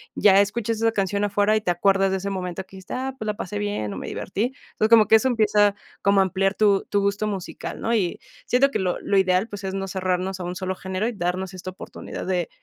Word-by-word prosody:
ya 200 -1 +6
escuchas 225 +2 -1
esa 225 +1 +2
canción 200 0 -1
afuera, 205 +1 +2
y 215 - +1
te 185 - +1
acuerdas 195 +2 +2
de 190 - +1
ese 195 +1 -4
momento 185 -1 -4
que 190 - -16
dijiste: 190 - -9
"Ah, 260 +1 -3
pues 220 - -6
la 210 - 0
pasé 205 +1 -5
bien, 205 - -2
o, - - -6
me - - -6
divertí. 225 +7 -2 0.2
Entonces, 215 - 0
como 225 -3 +7
que 220 - +7
eso 220 +4 +4
empieza 210 -3 +3 0.3
como 200 0 +4
a - - +6
ampliar 195 +1 0
tu 205 -2 +3
tu 205 - +2
gusto 200 +2 0
musical, 195 -4 -5
¿no? 230 - -1
Y 185 -6 0 0.3
siento 275 +3 +3
que - - -1
lo 185 -2 0
lo 200 - +1
ideal, 190 +2 +3
pues, 205 -2 -8
es 190 - -3
no 195 0 -3
cerrarnos 185 0 -1
a - - -3
un 180 +1 -4
solo 190 -1 -3
género, 190 +3 -3
y 240 - -2
darnos 185 -1 -2
esta 185 0 -7
oportunidad 185 - -8
de 180 -2 -1
195 Hz, 250 wpm, -24 LUFS, 185-210 Hz, 0.3 s, como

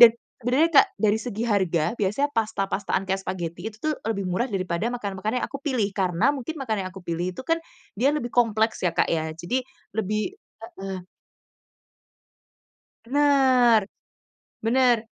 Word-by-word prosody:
Dan 235 -1 +10 0.2
sebenernya 255 +7 +3
Kak, - - +2
dari 215 0 +2
segi 225 0 -3
harga 190 -5 +1
biasanya 210 +9 +1
pasta-pastaan 200 -3 -1
kayak 190 0 -1
spaghetti 180 +1 -4
itu 215 - -14
tuh 310 - 0 0.2
lebih 200 -3 -1
murah 185 +8 0
daripada 185 0 -1
makanan-makanan 215 0 -2
yang - - -2
aku 275 - -7
pilih, 255 -8 0
karena 190 +7 +2
mungkin 285 +3 -5
makanan 220 -9 -2
yang - - -13
aku 190 - -10
pilih 175 +2 -2
itu - - -5
kan 330 +2 +1 0.4
dia 270 - +5
lebih 240 -5 -4
kompleks 220 -2 +2
ya 180 -2 +1
Kak - - +3
ya, 160 -1 0
jadi 175 +10 -1 0.3
lebih 215 - -2 0.2
heeh. 195 -5 -7 2.0
Bener 255 -5 +4 0.8
bener. 240 -1 +3
220 Hz, 150 wpm, -25 LUFS, 190-250 Hz, 2.0 s, Dan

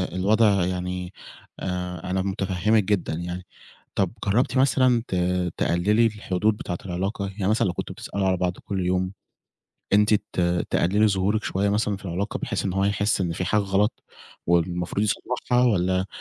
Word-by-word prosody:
الوضع 100 0 +3
يعني، 90 0 -3 0.5
آآ 90 -1 -4
أنا 95 - +1
متفهمِك 95 +2 +1
جدًا 95 -4 0
يعني، 90 +2 -5 0.5
طب 95 -2 +1
جربتِ 120 +7 +1
مثلًا 130 -3 +3
ت - - -2 0.4
تقللي 105 +7 +2
الحدود 105 -1 0
بتاعة 90 - -4
العلاقة؟ 95 +3 -2
يعني 95 -2 -1
مثلًا، 110 -2 +2
لو 90 - -1
كنتوا - - -5
بتسألوا 100 -1 -2
على 95 -1 +2
بعض 90 0 -1
كل 95 -3 -2
يوم، 90 +1 0 0.8
أنتِ 105 +1 +5
ت 100 - -2 0.3
تقللي 105 +5 +3
ظهورك 100 +2 0
شوية 100 +2 0
مثلًا 105 0 0
في 100 - -15
العلاقة، 95 +4 -3
بحيث - - -3
إن 95 - -1
هو 95 +1 +1
يحس 100 0 +1
إن 85 -3 0
فيه 90 +2 -3
حاجة 105 +4 +2
غلط، 100 +3 0 0.4
والمفروض 85 +4 +1
يصلحها، 125 +3 0
والّا، 95 -4 +2
95 Hz, 160 wpm, -24 LUFS, 90-105 Hz, 0.8 s, أنتِ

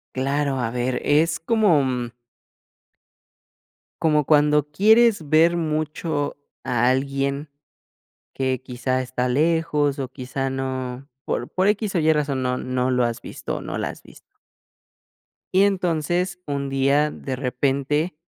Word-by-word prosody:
Claro, 140 0 0
a 115 -1 -1
ver, 125 +1 -1
es 155 +2 +2
como, 190 -7 +3
mm 125 -2 -3 1.9
como 150 -2 +3
cuando 150 0 +3
quieres 215 -3 +4
ver 165 +2 +5
mucho 155 -2 -2 0.3
a 120 +1 +2
alguien, 140 +2 -1 0.8
que 130 -1 -1
quizá 130 0 -2
está 125 0 -2
lejos 150 0 +1
o 130 -1 -3
quizá 130 +1 -4
no 130 0 -4 0.2
por 120 - -2
por 185 +2 +1
equis 205 -1 0
o - - +3
ye 160 0 +4
razón, 145 -3 -1
no 125 0 0
no 130 0 -1
lo 125 -1 +2
has 120 -1 -3
visto, - - -6
o - - -6
no - - -5
la - - -2
has - - -10
visto. - - -19 1.2
Y 190 +2 +5
entonces, 180 -2 0
un 140 -1 -2
día 140 +2 +2
de 130 -2 -5
repente, 140 +5 -1
140 Hz, 140 wpm, -23 LUFS, 130-160 Hz, 1.9 s, ver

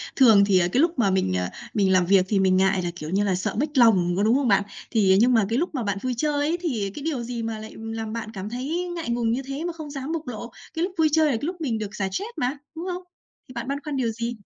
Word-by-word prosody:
Thường 220 -7 +7
thì 195 -2 +4
cái 180 +8 +1
lúc 330 -5 +1
mà 200 -4 +3
mình, 185 - +1
ờ, 90 - -1 0.3
mình 195 -3 +2
làm 185 -1 +4
việc 190 0 +4
thì 205 - +2
mình 190 -1 +3
ngại 190 0 +3
là, 175 - -1
kiểu 155 -2 -7
như 195 +3 +1
là, 195 -2 +1
sợ 185 - -2
mếch 295 -1 -1
lòng 190 -8 +5
có, 200 - +2
đúng 225 +3 +4
không 275 -1 +1
bạn? 200 -2 +4 0.3
Thì, 205 -5 +4
à, - - +5
nhưng 245 +3 +4
mà 220 -3 +4
cái 230 - +1
lúc 330 +2 -1
mà 250 - -1
bạn 200 -1 -1
vui 255 +1 -1
chơi 300 +4 0
ấy, 290 +4 0
thì 225 - -2
cái 290 - -7
điều 290 -7 -2
gì 235 -1 -4
mà 225 -1 -3
lại 220 - -9
làm 225 0 -5
bạn 230 -1 -5
cảm 195 +1 -5
thấy 300 +9 -3
ngại 330 -8 -4
ngùng 235 -1 +1
như 250 - 0
thế 275 +3 -4
mà 345 0 -3
không 310 -3 -8
dám 280 +1 -5
bộc 320 -4 -4
lộ? 235 0 -6 0.2
Cái 325 - -1
lúc 375 - -1
vui 315 -1 +4
chơi 315 +1 +4
là 295 - +3
cái 230 +2 -2
lúc 350 +2 -4
mình 245 -8 -1
được 210 -2 -5
xả 195 - -1
stress 405 - -3
mà, 255 +4 -1 0.2
đúng 330 +2 -5
không? 360 +1 -5 0.4
Thì 255 - -12
bạn 235 0 -5
băn 280 +1 -1
khoăn 295 -2 -3
điều 240 -3 +1
gì? 235 +2 -4
235 Hz, 305 wpm, -24 LUFS, 200-290 Hz, 0.4 s, Thường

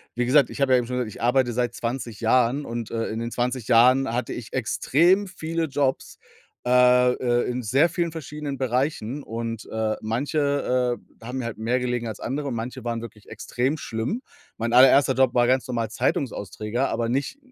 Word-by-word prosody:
wie 120 0 0
gesagt, 135 0 +4
ich - - -8
habe 135 -1 +3
ja 125 - +6
eben 120 - -4
schon 125 - -3
gesagt, 120 -3 -2
ich - - -11
arbeite 120 0 +2
seit 120 0 -1
20 115 -2 -4
Jahren 125 +4 +2
und, 115 -1 -5
äh, 115 -1 -1
in 110 - -4
den 115 0 -3
20 125 -1 -2
Jahren 125 +2 +5
hatte 120 0 -2
ich 115 -3 -8
extrem 170 - +2
viele 165 -2 -3
Jobs, 140 -2 -2 0.5
äh, 125 0 +5
äh, 120 -1 0
in 125 +1 -2
sehr 135 +10 +3
vielen 170 -1 -2
verschiedenen 150 -3 -6
Bereichen. 130 0 -1
Und, 115 -1 -5
äh, 110 -1 -1
manche, 125 0 0 0.2
äh, - - -12
haben 125 +2 -5
mir 125 - -3
halt 115 -2 -5
mehr 120 +3 0
gelegen 120 -2 -2
als 110 - -6
andere 140 +3 -3
und 125 - -3
manche 120 +2 -5
waren 115 -1 -3
wirklich 110 -2 -11
extrem 130 +6 -2
schlimm. 120 - -3 0.4
Mein 115 +1 -2
allererster 135 +2 +6
Job 130 -2 +2
war 120 0 +4
ganz 130 0 +2
normal 115 -3 -2
Zeitungsausträger, 110 +1 -2
aber 115 0 -1
nicht 140 - -2
125 Hz, 195 wpm, -24 LUFS, 115-135 Hz, 0.5 s, ja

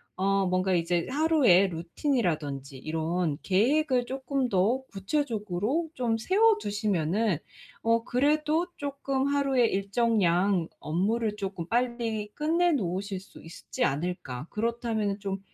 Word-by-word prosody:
어 195 +1 +1
뭔가 185 +1 +1
이제 170 0 +1
‘하루에 275 - +4
루틴이라든지 165 - -2
이런 160 +2 -1
계획을 250 +6 +2
쪼끔 265 +1 -2
더 210 +8 +2
구체적으로 220 - -1
좀 235 -3 0
세워 420 - +4
두시면은 205 - 0 0.4
어 230 0 +2
그래도 300 +7 +1
쪼끔 275 -1 -2
하루에 275 -3 +2
일정량 195 -4 +1
업무를 210 +7 0
쪼끔 190 -4 -4
빨리 235 -2 -1
끝내 335 +3 +2
놓으실 195 -3 -2
수 195 - -15
있지 165 - -5
않을까? 140 -4 -2
그렇다면은 220 -2 -1
좀 195 -1 -3
210 Hz, 270 characters per minute, -28 LUFS, 180-260 Hz, 0.4 s, 하루에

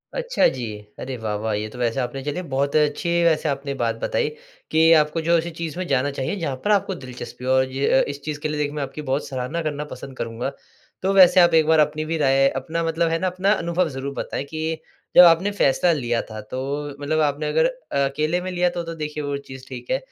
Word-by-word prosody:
अच्छा - - +2
जी, 125 -3 -3 0.3
अरे 130 -1 -5
वाह-वाह! 110 0 -2
ये 105 +1 -2
तो 115 - -12
वैसे 115 -2 0
आपने 125 +2 -3
चलिए 145 +5 -3
बहुत 140 +2 0
अच्छी 150 +2 +1
वैसे 160 -2 +2
आपने 140 0 -3
बात - - +1
बताई - - 0 0.4
कि 160 +1 +5
आपको 150 +2 0
जो 170 +1 +3
ऐसी 165 +1 -2
चीज़ 165 -1 -4
में 185 - -2
जाना 140 +1 +1
चाहिए 135 +9 -1
जहाँ 145 -6 -2
पर 210 - +3
आपको 200 -2 +2
दिलचस्पी 125 -3 -9
हो 130 - +1
और 130 0 +4
ज 135 +1 -3
अ, - - +5
इस 140 0 -6
चीज़ 150 -1 -3
के 155 - -2
लिए 150 - -3
देखिए 145 0 -1
मैं 150 - -2
आपकी 140 +3 -6
बहुत 135 0 -2
सराहना 130 +5 -3
करना 150 -2 -3
पसंद 135 -1 -9
करूँगा। 115 +3 -3 0.5
तो 190 - +1
वैसे 185 -1 +7
आप 175 -2 +6
एक 160 -1 +5
बार 160 -1 +5
अपनी 150 +1 +1
भी 160 +1 -2
राय 135 -2 +4
अपना 160 +6 -2
मतलब 165 0 +1
है 165 - +1
ना 185 - 0
अपना 185 +2 +1
अनुभव 170 -2 0
ज़रूर 135 0 -5
बताएँ 135 - -4
कि 160 +2 -4 0.3
जब 180 - +11
आपने 175 +4 +5
फ़ैसला 175 -2 +3
लिया 120 -6 0
था 110 - -7
तो 130 +1 -3 0.4
मतलब 155 +2 0
आपने 150 0 0
अगर 485 - +3
अ - - -1
अकेले 155 +5 -1
में 185 - -4
लिया 180 0 +2
तो 175 0 -4
तो 165 0 -6
देखिए 150 -1 -4
वो 145 0 -2
चीज़ 130 -2 -11
ठीक - - -8
है, - - +3
150 Hz, 240 wpm, -23 LUFS, 135-170 Hz, 0.5 s, जब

